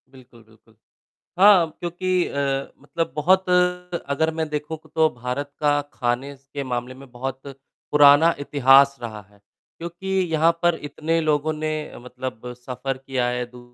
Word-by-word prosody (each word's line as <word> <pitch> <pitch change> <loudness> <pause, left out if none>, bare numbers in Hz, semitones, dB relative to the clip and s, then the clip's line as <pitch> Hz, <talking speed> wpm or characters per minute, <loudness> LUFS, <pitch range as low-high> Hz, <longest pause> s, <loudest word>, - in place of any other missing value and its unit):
बिल्कुल, 125 -3 -18
बिल्कुल। 110 0 -25 0.6
हाँ, 190 -4 +6
क्योंकि 180 +1 -1
अ, 140 -1 -2
मतलब 165 +4 -4
बहुत 185 +5 +2
अगर 180 -4 0
मैं 160 0 -2
देखूँ, 150 +1 -4 0.2
तो 160 -1 +4
भारत 125 +3 -5
का 145 -1 +2
खाने 125 +3 -2 0.2
के 140 - -3
मामले 125 -1 -4
में 135 +1 -14
बहुत 130 +2 -5 0.5
पुराना 150 +3 +6
इतिहास 140 -1 +4
रहा 110 -3 -6
है। 105 0 -24 0.4
क्योंकि 170 +3 -8 0.2
यहाँ 160 +1 +4
पर 175 -1 +3
इतने 155 +3 -1
लोगों 155 0 +1
ने 155 0 -3 0.3
मतलब 125 -1 -7
सफर 125 +2 -5
किया 130 -2 -2
है, 125 0 -2
दू 125 +1 -15
140 Hz, 145 wpm, -23 LUFS, 125-160 Hz, 0.6 s, हाँ